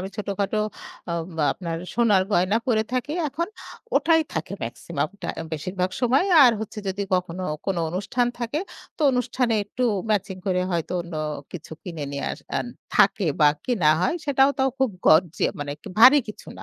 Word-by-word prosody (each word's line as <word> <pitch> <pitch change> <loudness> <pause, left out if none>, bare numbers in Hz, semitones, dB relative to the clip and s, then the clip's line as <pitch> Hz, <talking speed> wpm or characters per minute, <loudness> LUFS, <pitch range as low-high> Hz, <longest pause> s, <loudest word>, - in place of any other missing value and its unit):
আমি 190 - -4
ছোটখাটো 200 0 -2 0.5
অ্যা 170 - -2 0.4
আপনার 170 -3 -5 0.2
সোনার 215 -5 +4
গয়না 185 +4 +3
পড়ে 220 -4 +2
থাকি 255 +4 -1 0.2
এখন 335 +6 -3 0.5
ওটাই 325 -1 +4
থাকে 160 +3 -4
মেক্সিমামটা 155 - -4 0.2
বেশিরভাগ 180 +4 -2
সময়। 255 +7 +3 0.2
আর 245 - +7
হচ্ছে 220 0 -6
যদি 200 +2 -2
কখনো 180 0 -2 0.2
কোনো 190 -3 0
অনুষ্ঠান 200 +7 0
থাকে 240 +5 -2 0.4
তো - - -25
অনুষ্ঠানে 250 -1 0
একটু 240 +5 -5 0.3
ম্যাচিং 195 -2 0
করে 180 -1 +1
হয়তো 170 +1 -2
অন্য 170 -1 -9 0.4
কিছু 165 -2 -8
কিনে 165 -5 -5
নিয়ে 140 0 -4
আস - - -8 0.2
আ - - +2 0.4
থাকে - - +4 0.2
বা, 150 - +7 0.2
কিনা 200 -12 +2
হয় 185 - +1
সেটাও 275 -1 +4
তো - - +2 0.2
খুব 265 -2 +2 0.2
গর্জি 160 +1 +4 0.2
মানে 145 0 -3 0.3
ভারী 260 +6 +9
কিছু 210 - -9
না। - - -8
200 Hz, 160 wpm, -24 LUFS, 175-245 Hz, 0.5 s, ভারী